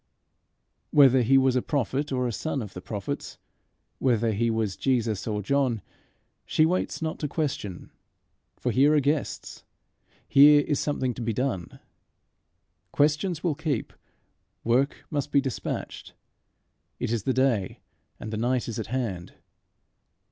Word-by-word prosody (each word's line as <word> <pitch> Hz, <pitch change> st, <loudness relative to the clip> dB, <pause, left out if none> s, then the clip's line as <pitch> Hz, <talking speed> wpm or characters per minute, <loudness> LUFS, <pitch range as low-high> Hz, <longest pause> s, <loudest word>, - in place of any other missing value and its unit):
Whether 135 Hz, -3 st, +6 dB
he 130 Hz, +3 st, +4 dB
was 130 Hz, -1 st, +3 dB
a 125 Hz, -, +2 dB
prophet 140 Hz, +2 st, -1 dB
or 125 Hz, -1 st, 0 dB
a -, -, -2 dB
son 140 Hz, +2 st, -3 dB
of 100 Hz, -, -9 dB
the 90 Hz, -, -8 dB
prophets, 100 Hz, 0 st, -5 dB, 0.6 s
whether 115 Hz, -3 st, +2 dB
he 115 Hz, +3 st, 0 dB
was 110 Hz, -4 st, -1 dB
Jesus 115 Hz, -6 st, 0 dB
or 105 Hz, -2 st, -2 dB
John, 130 Hz, -2 st, 0 dB, 0.6 s
she 155 Hz, -, +2 dB
waits 175 Hz, -1 st, -1 dB
not 160 Hz, -, -3 dB
to 150 Hz, -, -2 dB
question; 135 Hz, -, -4 dB, 0.7 s
for -, -, -1 dB
here 145 Hz, +4 st, +4 dB
are -, -, +5 dB
guests; 145 Hz, 0 st, -2 dB, 0.6 s
here 145 Hz, +1 st, +7 dB
is 145 Hz, -1 st, -1 dB
something 130 Hz, -4 st, -1 dB
to 120 Hz, -, -8 dB
be 115 Hz, -1 st, -1 dB
done. 105 Hz, -8 st, -3 dB, 1.1 s
Questions 155 Hz, +4 st, +1 dB
will 170 Hz, -4 st, +1 dB
keep; 145 Hz, -5 st, -3 dB, 0.7 s
work 125 Hz, +5 st, +1 dB
must 145 Hz, -3 st, -2 dB
be 140 Hz, -, +5 dB
despatched. 135 Hz, -3 st, -5 dB, 0.8 s
It -, -, -2 dB
is 115 Hz, -2 st, 0 dB
the 130 Hz, -, 0 dB
day, 130 Hz, -7 st, +1 dB, 0.4 s
and 110 Hz, -, -6 dB
the -, -, -2 dB
night 125 Hz, +2 st, 0 dB
is 115 Hz, -1 st, -4 dB
at 110 Hz, -, -4 dB
hand. 110 Hz, -9 st, -3 dB
130 Hz, 145 wpm, -26 LUFS, 110-145 Hz, 1.1 s, here